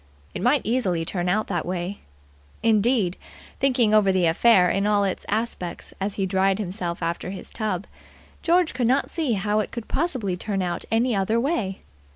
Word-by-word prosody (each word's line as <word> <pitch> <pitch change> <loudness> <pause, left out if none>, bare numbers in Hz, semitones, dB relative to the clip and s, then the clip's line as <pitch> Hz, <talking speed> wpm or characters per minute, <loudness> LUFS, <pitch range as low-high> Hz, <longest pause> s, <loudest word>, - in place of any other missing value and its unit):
It - - -5
might 255 +3 +3
easily 195 -9 0
turn 175 +1 -1
out 215 +4 +1
that 175 -4 -2
way. 180 +2 -4 0.6
Indeed, 220 -4 +2 0.4
thinking 250 -5 +3
over 210 -2 +5
the 185 -2 +2
affair 180 +3 +5
in 195 +3 +1
all 205 -1 +3
its 195 -2 -3
aspects 210 -5 -3
as 195 +1 -1
he 195 - 0
dried 190 +1 +2
himself 180 -4 -3
after 170 +2 -2
his 195 - -8
tub, 210 -4 -2 0.6
George 345 0 +2
could 250 -2 0
not 260 +3 +1
see 310 -8 0
how 210 +1 0
it 215 - -2
could 235 -2 -7
possibly 255 - -1
turn 195 +1 -2
out 175 -1 -3
any 230 +1 +2
other 200 +4 +1
way. 235 - -1
205 Hz, 180 wpm, -24 LUFS, 185-235 Hz, 0.6 s, over